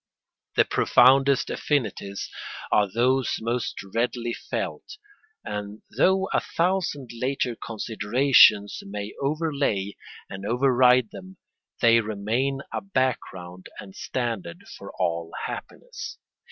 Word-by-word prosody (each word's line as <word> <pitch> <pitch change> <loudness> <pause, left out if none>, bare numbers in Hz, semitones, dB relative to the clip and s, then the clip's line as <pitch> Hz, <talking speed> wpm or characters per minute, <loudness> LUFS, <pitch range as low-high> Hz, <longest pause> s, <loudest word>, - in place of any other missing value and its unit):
The - - +5
profoundest 135 +2 +4
affinities 105 -8 -2 0.4
are 100 -2 +3
those 125 +3 +2
most 115 0 -3
readily 120 0 -1
felt, 420 - -5 0.5
and 105 0 -6
though 190 +1 +3
a - - +4
thousand 170 -7 -1
later 125 0 -1
considerations 110 -1 +3
may 100 +1 -6
overlay 140 -9 -1 0.3
and 95 0 -8
override 125 0 +4
them, 190 0 -11 0.4
they 115 -1 +6
remain 115 +6 -1
a - - -2
background 105 - -3
and 95 -2 -10
standard 110 -9 -4
for - - -10
all 85 -2 -2
happiness. - - -7
120 Hz, 100 wpm, -25 LUFS, 105-135 Hz, 0.5 s, they